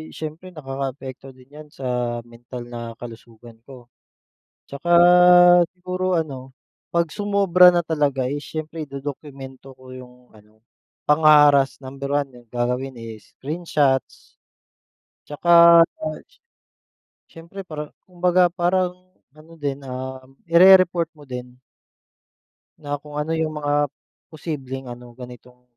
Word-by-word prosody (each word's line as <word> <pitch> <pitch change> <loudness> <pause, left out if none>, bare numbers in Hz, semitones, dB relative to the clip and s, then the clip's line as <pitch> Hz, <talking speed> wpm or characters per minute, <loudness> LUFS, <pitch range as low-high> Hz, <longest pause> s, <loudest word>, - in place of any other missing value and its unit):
siyempre 160 +3 -8
nakakaapekto 135 -1 -7
din 130 +1 -21
yan 150 +1 -12
sa 125 -4 -3
mental 120 +1 -11
na 115 -1 -7
kalusugan 115 -1 -13
ko. 125 -3 -15 0.7
At - - -72
saka 175 - -4 0.9
siguro 185 0 -2
ano, 135 -4 -5 0.3
pag 170 -2 -1
sumobra 195 -3 +4
na 175 -1 +2
talaga 145 -5 -1
eh 145 +3 -3
siyempre 155 +1 -7
idodokumento 135 -1 -9
ko 130 0 -14
yung 125 -1 -12 0.2
ano, 110 +1 -23 0.4
pangha-harass. 150 -2 +5
Number 135 +1 -7
1 145 -1 -1
yun 120 -1 -17
gagawin 125 +2 -3
is 115 -2 -12
screenshots. 145 -3 -2 0.8
At - - -
saka 170 +3 0 0.3
ats 315 - -9 0.9
siyempre 170 +4 -11
parang 150 -5 -8 0.2
kumbaga 180 0 +2
parang 180 +1 -2 0.2
ano 155 +2 -17
din, 140 -1 -4
um, 130 0 -8 0.2
irereport 175 -1 +5
mo 145 -3 -17
din. 125 0 -8 1.2
Na 145 -1 -5
kung 150 0 -13
ano 150 +2 -3
'yung 160 -1 -2
mga 145 0 0 0.4
posibleng 135 -5 -7
ano 120 0 -12
ganitong 125 0 -13
145 Hz, 120 wpm, -21 LUFS, 125-165 Hz, 1.2 s, pangha-harass